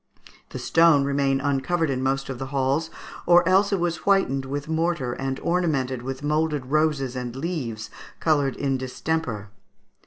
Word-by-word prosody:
The - - -7
stone 165 -4 +4
remained 140 -1 +1
uncovered 145 +3 0
in 130 -1 -2
most 135 +1 0
of 135 -2 -6
the 135 - -4
halls, 135 +3 0 0.4
or 175 0 +6
else 195 +2 +4
it 200 - +1
was 170 -1 0
whitened 190 -10 +1
with 140 +2 -4
mortar 160 -6 0
and 135 +1 -3
ornamented 145 -8 0
with 135 +2 -6
moulded 150 -2 0
roses 150 -4 +1
and 125 -1 -5
leaves, 130 -8 -4 0.3
coloured 145 -4 +1
in 135 -2 -1
distemper. 130 -5 -3
140 Hz, 155 wpm, -24 LUFS, 130-160 Hz, 0.4 s, or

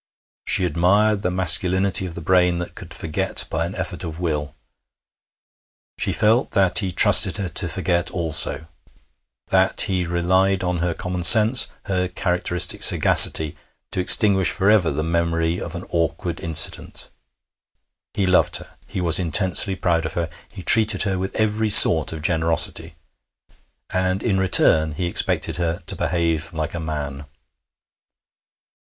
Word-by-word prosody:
She 95 - +2
admired 100 +6 -1
the 90 - -3
masculinity 95 +2 +3
of 85 - -12
the 85 - -9
brain 90 -1 0
that 90 0 -8
could - - -14
forget 80 -2 -2
by 80 +1 -4
an 95 - -10
effort 90 -3 -6
of 80 -1 -9
will. 75 -4 -5 1.4
She - - -1
felt 115 +4 0
that 95 -2 +2
he 95 -3 -4
trusted 90 - +4
her 95 -3 -5
to - - -1
forget 85 -1 -3
also; 80 -3 -1 0.8
that 95 0 0
he 95 -3 -2
relied 95 +2 -1
on 90 0 -3
her 85 -1 -4
common 90 -2 -7
sense, 110 +8 +6 0.2
her 90 -2 -3
characteristic 90 -1 -2
sagacity, 80 -2 +5 0.4
to - - -5
extinguish 95 +1 +3
for 100 +2 -1
ever 100 -6 +1
the 75 +2 -5
memory 85 0 -3
of - - -9
an - - -8
awkward 85 0 -4
incident. 80 0 0 1.0
He 100 - -2
loved 90 0 0
her. - - -7
He 95 - -7
was 85 -1 +3
intensely 90 +3 +1
proud 85 -3 -3
of - - -8
her. 85 -2 -5 0.2
He 95 - -12
treated 110 -2 +3
her 95 -2 -4
with 95 +1 -7
every 110 0 -2
sort 80 -6 +7
of 80 -2 -10
generosity. 80 -1 -1 1.0
And 95 +1 -3
in 100 -5 -2
return 80 -4 +2
he 90 +4 -6
expected 85 - -2
her 85 +1 -5
to - - -2
behave 80 -2 -4
like 80 -1 -6
a 85 - -7
man. 75 -3 -8
90 Hz, 150 wpm, -19 LUFS, 80-95 Hz, 1.4 s, sort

